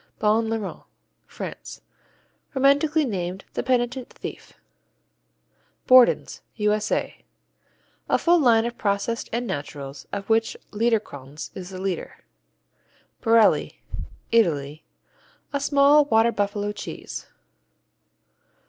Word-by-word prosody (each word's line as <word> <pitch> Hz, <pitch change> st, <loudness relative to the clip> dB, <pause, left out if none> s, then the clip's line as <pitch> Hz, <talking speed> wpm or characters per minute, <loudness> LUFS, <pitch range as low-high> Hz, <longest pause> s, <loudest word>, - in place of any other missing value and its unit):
Bon 220 Hz, +1 st, +2 dB
Larron 225 Hz, -3 st, -4 dB, 0.5 s
France -, -, -8 dB, 0.7 s
Romantically 285 Hz, +3 st, +3 dB
named 185 Hz, -4 st, -4 dB
"the -, -, -1 dB
penitent 250 Hz, 0 st, 0 dB
thief." -, -, -9 dB, 1.3 s
Borden's 255 Hz, -1 st, +5 dB
U.S.A. 210 Hz, 0 st, -1 dB, 0.9 s
A -, -, +4 dB
full 345 Hz, 0 st, +4 dB
line 235 Hz, -5 st, +4 dB
of 240 Hz, 0 st, -5 dB
processed 200 Hz, +3 st, -1 dB
and 240 Hz, +2 st, -2 dB
naturals, 140 Hz, -, -6 dB
of 200 Hz, -1 st, -5 dB
which 225 Hz, 0 st, +1 dB
Liederkranz 205 Hz, -, -2 dB
is 185 Hz, -1 st, -8 dB
the 190 Hz, -, -8 dB
leader. 190 Hz, -2 st, -4 dB, 1.0 s
Borelli 225 Hz, -2 st, +3 dB, 0.5 s
Italy 155 Hz, -9 st, +1 dB, 0.7 s
A 280 Hz, -, 0 dB
small 285 Hz, +1 st, +5 dB
water 225 Hz, -3 st, +3 dB
buffalo 205 Hz, -1 st, -1 dB
cheese. 210 Hz, -, -7 dB
225 Hz, 95 wpm, -24 LUFS, 195-245 Hz, 1.3 s, Borden's